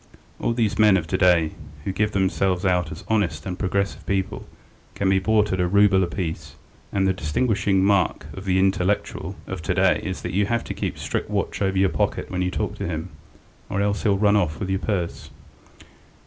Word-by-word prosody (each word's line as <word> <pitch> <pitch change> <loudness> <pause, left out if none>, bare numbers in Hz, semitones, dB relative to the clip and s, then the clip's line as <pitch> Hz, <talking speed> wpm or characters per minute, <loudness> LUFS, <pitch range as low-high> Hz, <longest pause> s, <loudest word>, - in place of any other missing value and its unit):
All 115 - 0
these 115 -3 0
men 105 -3 +6
of 85 - -2
to 80 - -2
day 85 -4 +4 0.3
who 95 - -2
give 105 +2 0
themselves 95 -1 +1
out 90 -3 +1
as 80 - -8
honest 90 -9 0
and 90 0 -5
progressive 100 +1 -1
people 95 -1 -2 0.5
can 95 -1 +1
be 95 - +4
bought 105 0 +2
at 95 - -1
a 90 - +2
rouble 100 0 +4
a - - 0
piece, 80 -4 -5 0.4
and 95 -1 +1
the 95 - +2
distinguishing 95 +3 +1
mark 100 -1 +2
of 95 - -8
the 95 -1 +2
'intellectual' 95 -1 0
of 95 -3 -5
to 90 +3 -1
day 95 0 +3
is 95 -3 -4
that - - -4
you 100 +1 +2
have 115 0 0
to - - -5
keep - - -3
strict - - -3
watch - - -2
over 95 -1 +1
your 95 0 +4
pocket - - -1
when 90 0 -1
you 90 - +1
talk - - -3
to - - -2
him, 80 -1 -4 0.6
or 100 - -1
else 100 0 0
he 110 - +1
will 100 - +3
run 105 0 +4
off 85 -6 0
with 95 -2 -3
your 95 - +1
purse." 85 -8 -3
95 Hz, 215 wpm, -23 LUFS, 90-100 Hz, 0.6 s, men